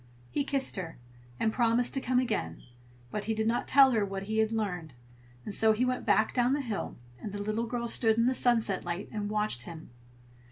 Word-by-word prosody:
He 285 - 0
kissed 275 -5 0
her, 170 -4 -5 0.4
and 220 - +1
promised 235 0 +2
to 270 - 0
come 255 0 0
again, 220 - -1 0.5
but 210 - -3
he 220 +1 -1
did 220 0 -1
not 235 +1 0
tell 270 -1 +7
her 220 -4 +2
what 195 -1 -4
he 220 +2 -2
had 220 0 +2
learned; 180 - -3 0.5
and 210 - -5
so 220 +1 +4
he 235 +4 +1
went 255 0 -2
back 220 - +3
down 245 +1 +2
the 290 - 0
hill, 225 -6 -4 0.2
and 210 - -5
the 205 - -5
little 215 +3 -2
girl 235 0 -3
stood 225 -1 +2
in 230 - +3
the 255 - +3
sunset 230 -6 +2
light 175 +3 -4
and 210 -2 -3
watched 210 - -1
him. 160 0 -9
220 Hz, 215 wpm, -29 LUFS, 205-245 Hz, 0.5 s, tell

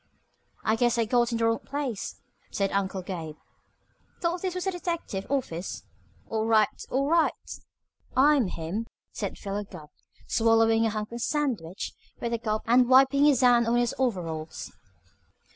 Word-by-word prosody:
"I 220 - +2
guess 240 0 +2
I 230 - +2
got 240 +1 +2
in 230 - 0
the 230 - +1
wrong 230 0 +2
place," 275 -7 -4 0.3
said 195 -1 -1
Uncle 190 -1 -1
Gabe. 165 -5 -6 0.8
"Thought 345 0 -1
this 370 -2 -2
was 365 - -3
a 385 - +1
detective 335 - -4
office. 215 -11 -3 0.4
All 220 0 -1
right! 215 -2 +2
All 275 +2 0
right!" 330 +1 +1 0.7
"I'm 280 -3 +5
him," 180 +7 -4 0.2
said 200 -3 -4
Philo 205 +1 -4
Gubb, 170 -7 -12 0.4
swallowing 225 0 +3
a - - +1
hunk 215 0 -4
of 235 0 -5
sandwich 230 - -2 0.3
with 235 0 -2
a 230 - 0
gulp 215 -1 -2
and 245 +1 +4
wiping 270 +2 +6
his 280 -4 +4
hand 240 -2 +5
on 235 - +2
his 240 -1 +1
overalls. 165 -10 -3
230 Hz, 160 wpm, -27 LUFS, 200-265 Hz, 0.8 s, wiping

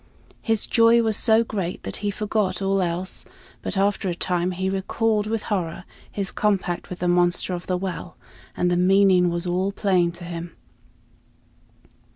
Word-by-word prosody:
His 225 -2 +1
joy 230 0 +5
was 220 -1 +1
so 225 +1 +4
great 195 -6 -4
that - - -5
he 205 - -2
forgot 210 -1 -1
all 195 0 +1
else; 180 +1 -2 0.4
but - - -4
after 200 0 +1
a 175 - -2
time 180 0 0
he 185 +1 -2
recalled 210 +3 0
with 220 -1 -2
horror 185 -3 -2 0.3
his 195 -2 -3
compact 195 -4 -1
with 180 - -6
the 180 - -2
monster 175 +1 +2
of 175 0 -5
the 185 - 0
well, 180 -1 -5 0.4
and 180 0 +1
the 175 - +2
meaning 185 -1 +4
was 170 +1 -2
all 185 +2 0
plain 185 -4 +1
to 175 +1 -10
him. 170 -1 -7
190 Hz, 170 wpm, -23 LUFS, 175-205 Hz, 0.4 s, joy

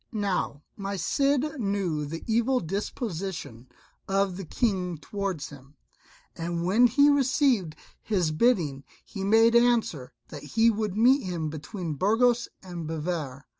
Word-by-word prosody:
Now 195 -8 -2
my 200 -1 -4
Cid 280 - 0
knew 195 -8 -1
the 165 +3 -6
evil 235 +3 +2
disposition 180 - -5 0.4
of 195 -1 +1
the 195 0 -6
King 185 - -1
toward 190 0 -4
him, 140 -1 -11 0.6
and 170 0 -3
when 220 +7 +5
he 285 +5 +5
received 260 - +2 0.3
his 180 -7 0
bidding 155 - +1 0.2
he 195 -3 -6
made 225 +3 +4
answer 230 - +2 0.2
that 145 - -8
he 225 +10 +3
would 210 -2 -3
meet 255 +5 +5
him 170 -5 -3
between 160 +2 -5
Burgos 235 - +2
and 175 -4 -6
Bivar. 155 -4 -4
195 Hz, 130 wpm, -27 LUFS, 160-230 Hz, 0.6 s, when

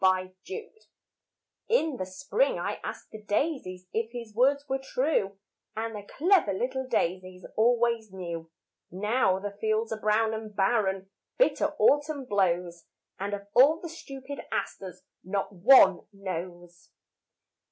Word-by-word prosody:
Wild 185 0 +3 0.2
Asters 440 +2 -8 0.8
In 320 - +2
the 185 - -4
spring 455 - 0
I - - -3
asked - - -7
the 215 - -9
daisies 205 - -2
If 225 0 -1
his 235 -3 -8
words 275 +5 +3
were 270 0 -1
true, 260 -7 0 0.4
And 225 +1 -2
the 205 - -5 0.2
clever 340 - +4
little 260 +6 -2
daisies 185 -1 -1
Always 235 -1 +2
knew. 170 -3 -6 0.4
Now 205 +1 +1
the 200 +1 -6
fields 220 +1 0
are 215 - -6
brown 220 +1 +2
and 220 -1 -6
barren, 195 -2 +1 0.3
Bitter - - +2
autumn 290 -1 +3
blows, 180 -5 0 0.3
And 200 +1 -2
of 200 0 -10
all 295 +6 +6
the 340 - -7
stupid 275 -3 -8
asters 185 -2 -4 0.2
Not 195 +2 -2
one 195 -2 +7
knows. 175 -3 -7
215 Hz, 135 wpm, -28 LUFS, 190-265 Hz, 0.8 s, one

